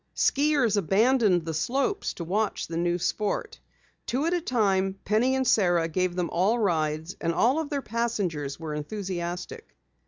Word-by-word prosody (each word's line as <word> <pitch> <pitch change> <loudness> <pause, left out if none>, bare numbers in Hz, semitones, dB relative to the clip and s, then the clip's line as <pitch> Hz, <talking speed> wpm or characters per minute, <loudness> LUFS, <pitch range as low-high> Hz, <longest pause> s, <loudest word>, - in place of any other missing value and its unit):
Skiers 280 -7 +2
abandoned 205 -1 +3
the 165 - -3
slopes 270 - -1
to 170 - -5
watch 205 +5 -1
the 165 - -7
new 175 +1 +1
sport. 215 - -2 0.5
Two 270 +5 0
at 335 - +1
a 350 - 0
time, 195 -8 +1
Penny 235 +5 +2
and 265 0 0
Sara 175 -7 +3
gave 180 +2 -1
them 180 -2 -2
rides 170 -5 0
and 165 - +1
all 250 - +2
of 315 -3 -3
their 280 -2 -2
passengers 195 -12 -2
were 160 -2 -5
enthusiastic. 180 - -5
195 Hz, 155 wpm, -26 LUFS, 170-245 Hz, 0.5 s, abandoned